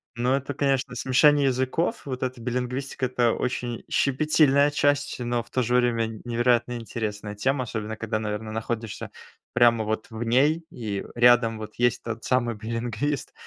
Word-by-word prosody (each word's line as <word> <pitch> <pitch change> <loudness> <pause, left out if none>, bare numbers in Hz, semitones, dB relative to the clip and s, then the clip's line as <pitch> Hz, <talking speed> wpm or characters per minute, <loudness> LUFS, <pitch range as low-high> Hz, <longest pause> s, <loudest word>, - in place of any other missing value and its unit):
ну 120 +2 0
это 140 +1 -1
конечно 135 -2 0
смешение 140 +3 +4
языков, 130 - -1
вот 130 -2 -4
эта 130 -1 -3
билингвистика 125 +2 -2
это 120 -2 +2
очень 120 -2 -3
щепетильная 145 0 +3
часть, 145 -1 +1
но 120 -1 -1
в - - -23
то 130 - 0
же 120 +2 0
время 120 -2 +2
н 110 -1 -7
невероятно 120 0 +1
интересная 105 -2 -5
тема, 130 +5 0
особенно 110 -2 -5
когда 110 0 -2
наверно 110 0 -4
находишься 115 0 -4 0.4
прямо 120 -2 +4
вот 110 0 -3
в 115 +1 -5
ней, 140 +8 +2
и 105 -4 -4
рядом 120 -1 +5
вот 110 0 -8
есть 120 -1 +1
тот 115 -1 -5
самый 120 -2 +1
билингвист. 115 +5 -3
120 Hz, 160 wpm, -25 LUFS, 115-130 Hz, 0.4 s, рядом